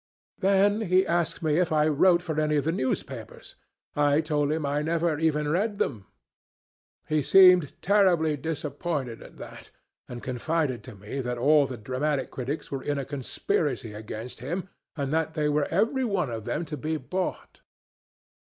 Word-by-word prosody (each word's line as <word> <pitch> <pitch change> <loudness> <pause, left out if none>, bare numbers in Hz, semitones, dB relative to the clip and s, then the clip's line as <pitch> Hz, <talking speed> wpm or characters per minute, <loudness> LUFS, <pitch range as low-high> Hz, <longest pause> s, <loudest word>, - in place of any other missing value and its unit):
"Then 200 +2 +3
he 185 -2 +3
asked 170 -1 -1
me 155 +1 +2
if 180 -1 +1
I 155 -1 +3
wrote 170 +4 +4
for 160 -3 -2
any 150 0 +1
of 145 - +1
the 160 - +2
newspapers. 130 -6 -4 0.4
I 145 0 +3
told 150 -2 0
him 155 -1 -1
I 145 +1 0
never 165 0 0
even 150 -2 +1
read 200 +7 0
them. 105 - -2 1.0
He 155 -1 +1
seemed 180 -1 +6
terribly 180 -6 +3
disappointed 145 -3 -4
at - - -13
that, - - -11 0.4
and 120 -1 -7
confided 130 -1 -1
to 125 - -10
me 105 +7 -6
that 125 -1 -3
all 145 +3 +4
the 130 - -6
dramatic 130 +5 -2
critics 135 +4 -5
were 135 -1 -3
in 145 +1 -2
a 140 - -3
conspiracy 135 -3 -2
against 110 +3 -7
him, 175 +10 -4 0.3
and 140 0 -2
that 160 0 0
they 150 -1 +1
were 145 0 +1
every 225 +9 +1
one 190 - 0
of 110 -2 -5
them 150 +8 -2
to 150 -1 -6
be 155 +4 -2
bought." 180 +7 -4
150 Hz, 170 wpm, -27 LUFS, 135-170 Hz, 1.0 s, seemed